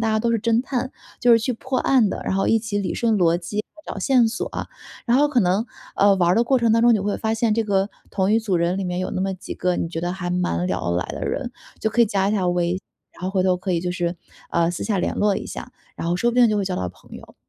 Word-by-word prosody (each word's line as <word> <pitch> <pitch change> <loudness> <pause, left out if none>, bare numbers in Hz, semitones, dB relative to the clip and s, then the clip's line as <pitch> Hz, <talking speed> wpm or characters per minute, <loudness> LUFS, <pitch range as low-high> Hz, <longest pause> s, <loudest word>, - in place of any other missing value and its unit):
大 225 - +1
家 220 0 +1
都 235 - +1
是 230 - +2
侦 230 +2 +1
探， 260 -1 -3 0.3
就 240 0 +5
是 230 - +7
去 240 +3 -1
破 260 +2 -3
案 250 -6 +3
的， - - -4
然 - - -1
后 195 - +1
一 225 - +4
起 215 -2 -3
理 200 - -2
顺 230 -2 +1
逻 170 -2 +3
辑， 205 +5 -4 0.2
找 - - -5
线 245 +3 +4
索。 225 - -3 0.6
然 240 - +4
后 295 +1 +4
可 280 -4 +1
能， 195 +4 +1 0.3
呃， 200 0 +5
玩 175 -2 +3
儿 180 - +4
的 230 +2 +3
过 260 +1 +3
程 230 -2 +2
当 230 - +4
中 240 -1 +6
你 - - +2
会 200 +1 -1
发 220 0 -1
现 225 0 +1
这 225 - +1
个， 200 -2 +1 0.2
同 195 +1 +1
一 225 - +5
组 210 -5 0
人 170 +2 0
里 195 - -2
面 180 0 -2
有 185 - -2
那 185 - -3
么 190 0 -1
几 185 +1 -8
个 180 0 0
你 - - -2
觉 165 -1 -4
得 175 +1 -2
还 180 -2 -4
蛮 135 - 0
聊 90 -1 -2
得 85 - 0
来 90 - -1
的 - - -6
人， 250 -3 -3 0.3
就 220 - -1
可 240 - +1
以 235 - +6
加 195 -1 +1
一 210 - 0
下 185 -4 +1
微 175 -1 +1
信。 185 - -2 0.3
然 - - -17
后 185 - -1
回 190 -1 +1
头 185 -1 +2
可 185 +1 -3
以 170 - +1
就 180 +1 -2
是， 175 -1 -2 0.3
呃， 170 0 +2
私 175 - -5
下 205 -3 0
联 - - -1
络 205 -1 +2
一 - - -5
下， - - -8 0.2
然 165 - -4
后 175 - +1
说 240 +6 +2
不 235 - -6
定 240 -2 +6
就 210 - +1
会 200 - 0
交 185 -1 -2
到 90 - -2
朋 90 - -18
友。 - - -14
200 Hz, 330 characters per minute, -22 LUFS, 180-230 Hz, 0.6 s, 是